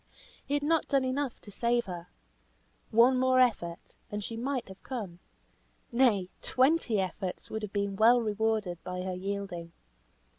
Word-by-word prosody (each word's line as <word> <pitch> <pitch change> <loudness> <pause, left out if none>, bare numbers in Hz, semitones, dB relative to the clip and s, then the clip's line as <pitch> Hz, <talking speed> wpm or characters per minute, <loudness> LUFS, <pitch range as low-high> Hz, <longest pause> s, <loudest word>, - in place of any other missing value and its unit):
He 285 - -1
had 290 - 0
not 320 +1 +2
done 275 -2 +2
enough 260 0 -2
to 205 - -11
save 235 +3 +1
her. 175 -2 -7 0.8
One 240 +3 +5
more 260 0 +4
effort, 195 -9 +1 0.2
and 210 0 -3
she 225 - -5
might 255 +2 -2
have 190 0 -12
come. 205 -10 -6 0.7
Nay, 235 -7 +3
twenty 260 -4 +2
efforts 185 0 -4
would 220 - -3
have 210 -2 -5
been 200 -1 -1
well 230 +4 +6
rewarded 215 -5 -1
by 180 0 -4
her 185 0 -3
yielding. 180 -3 -4
220 Hz, 155 wpm, -30 LUFS, 190-255 Hz, 0.8 s, well